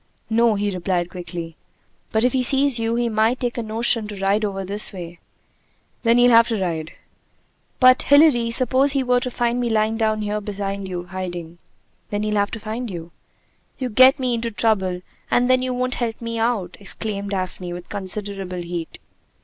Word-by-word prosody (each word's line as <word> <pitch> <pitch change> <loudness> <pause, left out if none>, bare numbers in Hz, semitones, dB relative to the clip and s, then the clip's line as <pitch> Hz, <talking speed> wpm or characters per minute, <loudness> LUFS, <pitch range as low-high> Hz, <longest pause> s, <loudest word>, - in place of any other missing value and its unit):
"No," 230 -1 +3
he 205 0 -1
replied 180 -1 -2
quickly. 175 -2 -7 0.5
"But 220 +1 +1
if 250 - +2
he 260 - +1
sees 270 0 +4
you, 225 0 -1
he 240 0 0
might 225 +2 +1
take 245 -1 -2
a - - -1
notion 225 0 +1
to 205 -2 -8
ride 200 +2 +1
over 195 -2 -3
this 205 +3 +5
way!" 175 -3 -9 0.8
"Then 230 0 +3
he'll 245 0 +5
have 230 0 +6
to 225 -3 -2
ride." 165 -4 -3 0.9
"But, 255 0 +6
Hilary, 285 -5 +5
suppose 260 +3 +3
he 275 -2 +1
were 250 -1 +2
to 250 - -4
find 240 0 -1
me 240 -1 -1
lying 220 0 +1
down 215 -1 0
here 210 0 -2
behind 200 -1 -4
you, 180 -1 -5
hiding?" 175 -2 -7 0.5
"Then 205 0 -2
he'll 215 0 -1
have 205 0 +1
to 225 - -6
find 225 +3 -5
you." 170 -2 -8 0.7
"You 255 -2 -3
get 260 +5 +6
me 255 -3 -1
into 230 0 -2
trouble, 190 -4 0 0.3
and 245 0 +2
then 255 0 +3
you 255 0 -2
won't 250 0 -1
help 225 -2 -2
me 230 -1 -4
out!" 225 -6 -1
exclaimed 200 0 -4
Daphne 185 -2 -4
with 175 0 -8
considerable 195 -2 -4
heat. 170 -1 -6
215 Hz, 190 wpm, -21 LUFS, 190-240 Hz, 0.9 s, have